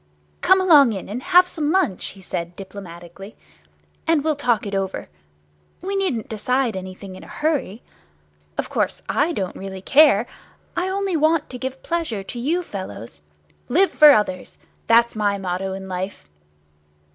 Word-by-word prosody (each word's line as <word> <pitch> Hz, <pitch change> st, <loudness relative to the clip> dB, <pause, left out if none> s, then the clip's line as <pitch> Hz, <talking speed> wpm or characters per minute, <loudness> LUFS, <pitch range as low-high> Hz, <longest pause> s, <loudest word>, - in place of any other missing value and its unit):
"Come 375 Hz, +1 st, +5 dB
along 295 Hz, -10 st, +6 dB
in, 190 Hz, -, -6 dB
and 225 Hz, +5 st, -5 dB
have 360 Hz, +4 st, +5 dB
some 315 Hz, -4 st, -2 dB
lunch," 340 Hz, -, +1 dB
he 195 Hz, -, -7 dB
said, 175 Hz, -1 st, -5 dB
diplomatically, 190 Hz, 0 st, -10 dB, 0.7 s
"and 325 Hz, -3 st, +3 dB
we'll 310 Hz, -1 st, +1 dB
talk 245 Hz, -7 st, 0 dB
it 200 Hz, -, -5 dB
over. 195 Hz, -, -3 dB, 0.7 s
We 390 Hz, +3 st, -4 dB
needn't 355 Hz, -, -1 dB
decide 245 Hz, +1 st, 0 dB
anything 185 Hz, +1 st, -8 dB
in 185 Hz, -, -11 dB
a -, -, -13 dB
hurry. 290 Hz, -8 st, -2 dB, 0.7 s
Of -, -, -1 dB
course, -, -, -2 dB
I 310 Hz, +4 st, +1 dB
don't 190 Hz, -, -3 dB
really 190 Hz, -1 st, -7 dB
care. 275 Hz, -6 st, +5 dB, 0.5 s
I 360 Hz, +2 st, -1 dB
only 390 Hz, -1 st, -1 dB
want 315 Hz, 0 st, +2 dB
to 250 Hz, -, -7 dB
give 260 Hz, +1 st, -5 dB
pleasure 320 Hz, -13 st, -2 dB
to 240 Hz, +5 st, -7 dB
you 330 Hz, +9 st, 0 dB
fellows. 115 Hz, -, -8 dB, 0.5 s
'Live 370 Hz, +10 st, +3 dB
for 300 Hz, -1 st, +8 dB
others!' 210 Hz, -7 st, 0 dB, 0.3 s
That's 235 Hz, 0 st, +4 dB
my 205 Hz, -2 st, +1 dB
motto 190 Hz, 0 st, -3 dB
in 190 Hz, 0 st, -7 dB
life." 185 Hz, -, -5 dB
230 Hz, 155 wpm, -22 LUFS, 190-315 Hz, 0.7 s, for